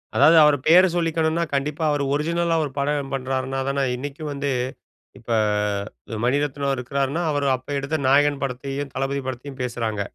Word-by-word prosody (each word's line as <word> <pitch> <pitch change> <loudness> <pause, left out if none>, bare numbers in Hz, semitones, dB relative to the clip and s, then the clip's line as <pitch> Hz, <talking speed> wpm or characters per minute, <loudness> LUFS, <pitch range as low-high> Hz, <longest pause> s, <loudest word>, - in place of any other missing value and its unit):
அதாவது, 165 - +6
அவர் 150 -1 +5
பெயர 175 +3 +8
சொல்லிக்கணும்னா 165 -1 +1
கண்டிப்பா 145 +3 -1
அவரு 145 -1 0
ஒரிஜினல்லா 165 +3 0
ஒரு 145 - -4
படம் 140 -1 -1
பண்றாருனா 135 0 -2
தான, 140 0 0
இன்னைக்கும் 145 +4 -6
வந்து 140 0 -2 0.7
இப்ப 120 -1 -12 0.9
மணிரத்னம் 140 +1 0
இருக்கிறாருன்னா, 140 +5 -1
அவரு 145 -1 0
அப்ப 130 - -19
எடுத்த 140 +3 -2
நாயகன் 145 +1 +3
படத்தையும், 135 +1 -4
தளபதி 135 +1 -1
படத்தையும் 130 +1 -6
பேசுறாங்க. 115 -4 -3
140 Hz, 140 wpm, -23 LUFS, 135-150 Hz, 0.9 s, பெயர